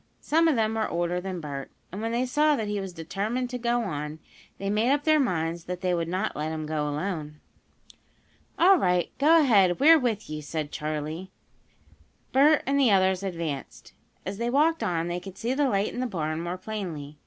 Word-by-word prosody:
Some 330 +2 +3
of 315 - +3
them 220 -1 +1
were 220 -1 -1
older 175 +1 -1
than 185 -1 -5
Bert, 140 -3 -6 0.2
and 195 +4 -6
when 225 +1 -2
they 240 +2 0
saw 300 +3 +3
that 220 -6 -3
he 205 0 -2
was 195 -1 -5
determined 200 +9 -3
to 250 - -4
go 240 0 0
on, 150 -5 -4 0.4
they 195 - -5
made 215 +5 +2
up 290 +1 +1
their 310 -1 +4
minds 170 - -1
that 180 0 -5
they 180 -1 +1
would 170 -1 -1
not 185 +5 -2
let 155 +1 -3
him 155 -1 -4
go 150 -1 -2
alone. 150 -1 -4 1.2
"All 375 +3 +6
right 180 -1 +1
go 320 +4 +6
ahead 200 - +4
we're 315 +3 +7
with 230 -5 -2
you," 155 0 -5
said 150 0 -4
Charley. 155 +4 -4 1.0
Bert 290 +2 +5
and 280 +1 +1
the 265 -4 +5
others 190 -2 +3
advanced. 165 -7 -5 0.3
As 200 - -5
they 235 0 0
walked 310 +5 +2
on 170 -1 -1
they 175 +1 -2
could 190 +1 -11
see 240 +3 -1
the 280 0 +1
light 200 -1 0
in - - -5
the 255 - 0
barn 160 -6 -3
more 175 +2 -4
plainly. 175 -8 -6
190 Hz, 205 wpm, -26 LUFS, 165-245 Hz, 1.2 s, we're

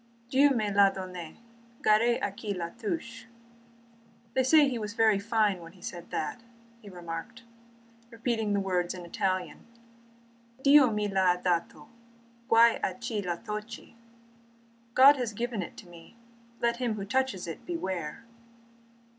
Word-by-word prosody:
"'Dieu 280 +2 +5
me 220 -6 0
la 200 0 +6
donne, 185 -4 -8 0.5
gare 230 +3 +4
à 205 - 0
qui 205 -1 -4
la 170 -2 -4
touche!'' 230 0 -5 0.5
* 230 0 -31
They 260 - +2
say 290 +3 +5
he 250 -3 -2
was 210 0 -5
very 220 -3 +4
fine 210 -2 +1
when 165 0 -12
he 185 - -19
said 175 -1 -7
that," 195 +10 -4 0.4
he 210 - -12
remarked, 175 +5 -8 0.7
repeating 230 -2 -2
the 200 - +2
words 180 -2 -1
in 180 -1 -8
Italian: 185 +1 -3 1.0
"'Dio 280 -2 +7
mi 210 -1 -1
l'ha 190 -2 +2
dato. 180 +1 -2 0.6
Guai 230 0 +5
a - - -1
chi 230 -3 -3
la 175 -2 -2
tocchi!'' 215 +3 -8 0.5
* 235 0 -33
God 280 +2 +9
has 240 -4 -3
given 235 -1 -3
it 175 - -8
to - - -12
me, 175 +5 -15 0.4
let 235 0 +1
him 240 -3 -1
who 200 -2 -5
touches 260 -4 -1
it 165 - -7
beware! 190 - -4
215 Hz, 155 wpm, -29 LUFS, 185-235 Hz, 1.0 s, God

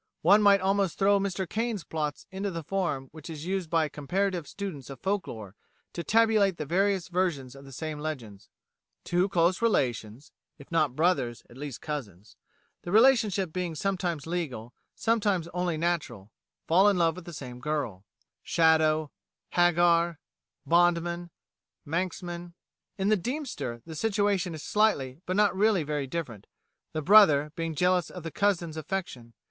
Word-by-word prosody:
One 200 +6 +6
might 200 -1 +5
almost 195 -3 +1
throw 200 0 +4
Mr 190 -1 -2
Caine's 220 -1 -2
plots 150 -2 -4
into 195 +1 -3
the 165 -3 -5
form 160 -7 -2
which 155 +1 -11
is 155 -1 -7
used 185 -2 -2
by 165 -1 +2
comparative 175 +3 -2
students 175 -10 -6
of 135 - -9
folk 195 0 -1
lore 105 -3 -8 0.4
to 170 - -4
tabulate 215 -4 +3
the 150 - -4
various 190 +3 +1
versions 170 -8 -1
of 135 0 -13
the 135 - -12
same 155 +2 -5
legends. 120 -10 -6 0.5
Two 180 +3 +1
close 175 +2 +2
relations 125 - -1 0.3
(if 140 - -15
not 155 -6 +1
brothers, 140 -8 +1
at - - -14
least 140 -2 -7
cousins) 110 - -7 0.5
the 175 - -6
relationship 215 -6 +4
being 180 -3 -3
sometimes 175 -4 -2
legal, 140 -9 -4 0.2
sometimes 205 -7 +1
only 175 -2 -2
natural, 150 - -2 0.3
fall 190 +5 +5
in 200 - +1
love 165 -2 +2
with 185 - -10
the 175 - -8
same 125 -5 -8
girl 125 -9 -3 0.4
('Shadow,' 155 -2 +3 0.4
'Hagar,' 175 -1 +3 0.5
'Bondman,' 175 0 +2 0.6
'Manxman'); 175 +1 -4 0.4
in 195 +1 0
'The 215 - +4
Deemster' 235 - -4
the 165 - -8
situation 200 -2 0
is 155 - -8
slightly 160 -10 +1
but 185 - -1
not 205 -1 +3
really 200 -3 +3
very 145 -2 -3
different, 130 - -5 0.4
the 155 - -3
brother 155 -7 +6
being 165 -1 -3
jealous 180 +1 +2
of 180 - -9
the 165 - -5
cousin's 180 -6 0
affection. 155 -8 -5
170 Hz, 155 wpm, -28 LUFS, 150-195 Hz, 0.6 s, One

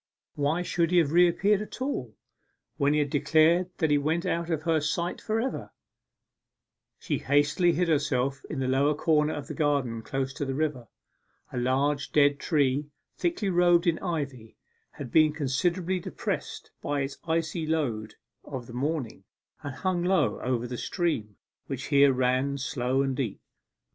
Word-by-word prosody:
Why 150 +5 0
should 170 -1 0
he 180 - +2
have 160 -4 +3
reappeared 180 +4 +4
at 215 - -8
all, 135 - -3 0.6
when 145 +1 +2
he - - +2
had 145 -2 0
declared 160 +4 +3
that 160 -3 +1
he 145 - +4
went 160 +4 0
out 170 0 -1
of 160 -2 -1
her 160 -2 +2
sight 170 +4 -2
for 220 +1 -1
ever? 260 +4 -3 1.3
She - - -2
hastily 145 +5 +2
hid 175 +3 +1
herself, 140 -3 0
in - - -4
the 130 -1 -1
lowest 140 +3 +2
corner 155 -2 +2
of 145 -2 -5
the - - -6
garden 140 -7 0
close 135 +3 -3
to 145 - -4
the 135 -1 -2
river. 145 -5 -2 0.7
A 125 - -1
large 140 +3 0
dead 145 -1 +4
tree, 145 -2 +1 0.3
thickly 335 - -1
robed 175 0 +4
in 170 -2 +2
ivy, 140 - -4 0.4
had 130 -4 -8
been 155 -1 +5
considerably 170 +6 0
depressed - - -5
by 145 -1 -1
its 135 0 -4
icy 165 0 -1
load 115 -10 -1 0.3
of 130 -4 -6
the 120 - -11
morning, 140 0 -3 0.4
and 145 -2 -6
hung 185 0 -1
low 180 -5 +2
over 125 -1 -1
the 125 0 -5
stream, 120 - -2 0.3
which 135 -1 -5
here 140 0 +6
ran 130 +2 +1
slow 130 0 0
and 135 -1 -1
deep. 125 -8 -3
145 Hz, 165 wpm, -27 LUFS, 135-170 Hz, 1.3 s, here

